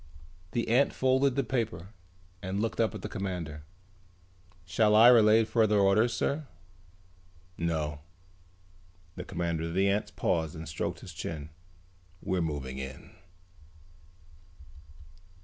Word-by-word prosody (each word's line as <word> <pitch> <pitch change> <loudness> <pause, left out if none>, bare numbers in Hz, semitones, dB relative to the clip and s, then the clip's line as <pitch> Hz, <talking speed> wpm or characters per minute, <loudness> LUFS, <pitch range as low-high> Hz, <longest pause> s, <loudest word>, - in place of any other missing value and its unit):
The 120 - -1
ant 130 +5 +3
folded 130 0 +2
the 140 - +1
paper 115 -7 -3 0.5
and 95 +1 -3
looked 115 +1 -2
up 115 -1 +1
at - - -8
the - - -3
commander. 90 -7 -5 1.0
"Shall 105 +3 +3
I 115 +3 +9
relay 110 -2 +6
further 110 -2 +2
orders, 100 +4 +4
sir?" 140 +5 -2 1.1
"No." 80 -3 -2 1.2
The - - -6
commander 85 -1 -2
of 85 +1 -5
the 95 +1 +3
ants 100 +2 0
paused 80 0 -1
and 80 0 -7
stroked 80 - -4
his - - -10
chin. 75 -1 -6 0.7
"We're 90 0 -1
moving 70 -5 -4
in." 65 -1 -8
95 Hz, 120 wpm, -29 LUFS, 80-115 Hz, 1.2 s, I